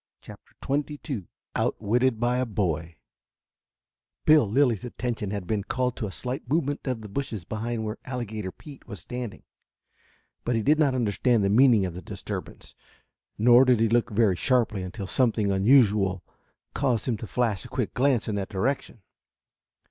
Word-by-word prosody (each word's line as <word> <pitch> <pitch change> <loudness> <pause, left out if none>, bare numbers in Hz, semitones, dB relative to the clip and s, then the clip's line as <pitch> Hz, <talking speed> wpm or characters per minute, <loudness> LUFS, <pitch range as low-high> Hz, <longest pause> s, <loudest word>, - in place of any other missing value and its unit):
CHAPTER - - -14
XXII 140 - -3 0.3
OUTWITTED 115 +3 +1
BY 120 +1 +1
A 130 - +1
BOY 85 -6 -2 1.3
Bill 150 -9 +5
Lilly's 120 -3 +2
attention 120 -4 -4
had 100 -2 -4
been 105 +1 -1
called 125 +3 -1
to 110 - -3
a - - -7
slight 125 +4 -5
movement 145 -2 -1
of 125 -3 -2
the 105 - -8
bushes 105 -4 -4
behind 110 +2 -3
where 110 +1 -5
Alligator 110 -6 -4
Pete 145 +5 -14
was 105 -5 -7
standing, 125 +4 -6 1.0
but 120 - 0
he 115 - 0
did 150 +5 +3
not 140 -4 +3
understand 115 -1 +1
the - - +2
meaning 115 -3 +5
of 90 - -4
the 90 - -7
disturbance, - - -7 0.6
nor 120 +3 +7
did 125 -3 +3
he 115 0 +3
look 120 +1 +2
very 105 -3 +2
sharply 115 0 +1
until 95 +3 -6
something 110 -1 +1
unusual 100 -3 +3 0.5
caused 130 -5 0
him 120 - +1
to 110 - -7
flash 115 -6 -1
a - - -9
quick 125 -4 -2
glance 130 -3 +2
in 110 - -1
that 100 -1 -3
direction. 115 0 -2
115 Hz, 165 wpm, -26 LUFS, 100-130 Hz, 1.3 s, nor